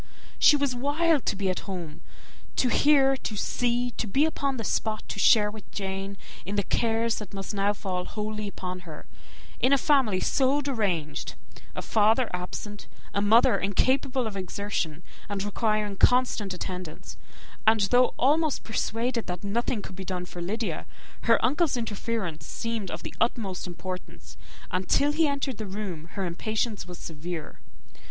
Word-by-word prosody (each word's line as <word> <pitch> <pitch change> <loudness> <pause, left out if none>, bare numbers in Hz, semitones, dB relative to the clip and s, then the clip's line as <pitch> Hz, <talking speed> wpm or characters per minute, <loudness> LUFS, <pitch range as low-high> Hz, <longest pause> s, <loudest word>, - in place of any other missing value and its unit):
She 300 - +8
was 280 -3 +1
wild 290 +4 +1
to - - +2
be 190 -1 0
at 185 - -3
home 175 -5 -6 0.5
to 250 - +3
hear, 270 0 +5
to 220 - -4
see, 245 +3 0
to 225 - -1
be 275 +9 +3
upon 280 -4 -1
the 225 - -3
spot 215 +1 -1
to 200 - -4
share 210 0 +6
with 215 0 -11
Jane 195 0 -4 0.3
in 200 - -4
the 200 - +2
cares 230 +1 +1
that 205 -2 -8
must 195 +2 -4
now 200 0 +2
fall 185 -3 -3
wholly 215 0 -4
upon 185 -2 -5
her, 165 -4 -10 0.5
in 255 - +3
a 280 - +7
family 260 -9 +3
so 270 +5 +2
deranged; 200 - -1 0.4
a - - -4
father 220 +3 +3
absent, 195 +3 -5 0.3
a 200 - +1
mother 220 +3 +5
incapable 260 +6 +1
of 215 -2 -4
exertion, 185 -4 -3 0.3
and 200 -1 -2
requiring 210 -1 0
constant 245 -5 +3
attendance; 180 -2 -6 0.5
and 220 -1 +6
though 250 0 +5
almost 300 +2 +2
persuaded 230 +2 -1
that 180 +1 -4
nothing 215 +1 -1
could 190 - -8
be 190 - -6
done 180 -1 -3
for 175 0 -8
Lydia, 215 +6 -2 0.4
her 230 -1 +6
uncle's 290 +1 +2
interference 220 -6 -3
seemed 230 -4 -3
of - - -5
the - - -6
utmost 210 -6 0
importance, 180 +1 -7 0.4
and 185 0 -1
till 290 +1 +4
he 315 +1 +3
entered 280 -4 -1
the 215 - -4
room 190 - -7
the 210 0 -2
misery 155 - -12
of - - -17
her 195 - -1
impatience 215 +3 -2
was 180 -1 -8
severe. 165 0 -6
215 Hz, 170 wpm, -27 LUFS, 190-245 Hz, 0.5 s, She